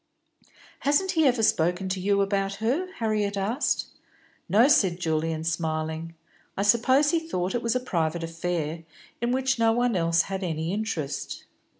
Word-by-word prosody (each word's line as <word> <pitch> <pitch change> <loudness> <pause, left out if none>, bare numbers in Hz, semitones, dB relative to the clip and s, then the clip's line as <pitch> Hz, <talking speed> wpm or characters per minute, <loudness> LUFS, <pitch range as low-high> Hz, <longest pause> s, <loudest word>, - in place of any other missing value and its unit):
"Hasn't 325 +7 +2
he 320 -3 +3
ever 245 -3 +2
spoken 185 -3 +2
to 185 0 -2
you 200 +2 +2
about 195 0 -1
her?" 265 - -1
Harriet 210 - -1
asked. 220 +8 0 0.6
"No," 225 +6 +5
said 190 - +3
Julian, 160 -1 -1
smiling. 160 0 -3 0.4
"I 195 - +1
suppose 255 +7 +4
he 335 - +2
thought 190 - -3
it 240 - -1
was 230 +1 0
a - - +2
private 170 -8 -1
affair, 165 -1 -3 0.4
in 240 0 0
which 265 0 0
no 225 0 +4
one 240 -1 +1
else 170 -1 +2
had 195 0 -4
any 165 0 -2
interest." 200 -9 -4
195 Hz, 160 wpm, -26 LUFS, 165-240 Hz, 0.6 s, No